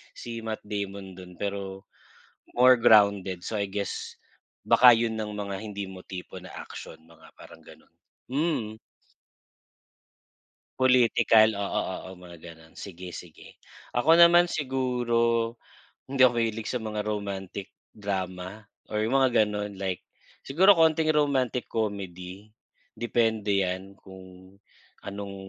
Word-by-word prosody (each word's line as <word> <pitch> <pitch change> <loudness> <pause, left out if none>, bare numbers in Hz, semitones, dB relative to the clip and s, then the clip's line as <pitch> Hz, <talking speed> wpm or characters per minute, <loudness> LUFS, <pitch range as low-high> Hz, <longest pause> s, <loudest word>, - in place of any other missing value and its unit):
si 115 -1 -7
Matt 110 -1 -4
Damon 100 -2 -5
dun, 90 -1 -11
pero 100 -1 -4 0.7
more 125 +1 +7
grounded. 100 -5 +4
So, 110 - -3
I 105 - 0
guess, 100 -1 -5 0.5
baka 120 +2 +8
yun 115 -1 +1
ang 110 -1 -4
mga 100 -1 -4
hindi 100 -2 -6
mo 95 -1 -11
tipo 90 -2 -9
na - - -11
action, 80 - -9
mga 80 0 -19
parang - - -15
ganun. - - -17 0.4
Hmm. 135 -6 -1 2.0
Political, 115 -4 +4
oo, 100 0 -1 0.3
oo, - - -9
mga 90 -1 -13
ganun. 80 0 -14
Sige, 90 -2 -8
sige, 85 -1 -12 0.4
ako 150 +7 +5
naman 170 +1 +7
siguro, 120 -5 0 0.5
hindi 135 -2 +6
ako 125 - +2
mahilig 115 -1 -3
sa 125 -2 -3
mga 105 -1 -4
romantic 100 -2 -5 0.2
drama, 95 0 -5 0.2
or 105 - -2
yung 120 - -1
mga 120 -4 +4
gano'n, 105 -1 -5
like 95 -2 -3 0.4
siguro 185 +9 +5
konting 160 -2 +3
romantic 130 -5 0
comedy. 100 -2 -5 0.5
Depende 110 -4 +1
yan 95 +1 -4
kung 95 0 -14 0.5
anong 100 0 -6
105 Hz, 125 wpm, -27 LUFS, 95-120 Hz, 2.0 s, baka